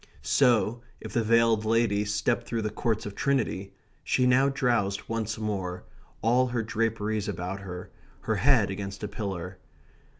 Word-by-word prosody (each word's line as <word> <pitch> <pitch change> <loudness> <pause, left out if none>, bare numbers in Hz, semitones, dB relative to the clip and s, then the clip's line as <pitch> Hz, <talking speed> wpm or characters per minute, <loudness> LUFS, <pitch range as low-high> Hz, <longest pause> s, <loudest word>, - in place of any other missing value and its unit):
So, 120 -3 +3 0.2
if - - -8
the 120 - +2
veiled 115 -1 +3
lady 110 -2 +2
stepped 110 +3 0
through 115 -2 -2
the 105 - -2
Courts 110 0 -1
of 105 - -5
Trinity, 115 -7 -1 0.3
she 125 - +2
now 130 +2 +4
drowsed 120 -7 0
once 110 -1 -2
more, 95 -5 -3 0.4
all 125 +3 +4
her 120 -2 -1
draperies 110 -1 -1
about 95 0 -4
her, 90 -2 -8 0.3
her - - -1
head - - +4
against 100 +1 -6
a - - -1
pillar. 95 -3 -5
110 Hz, 155 wpm, -27 LUFS, 100-115 Hz, 0.4 s, now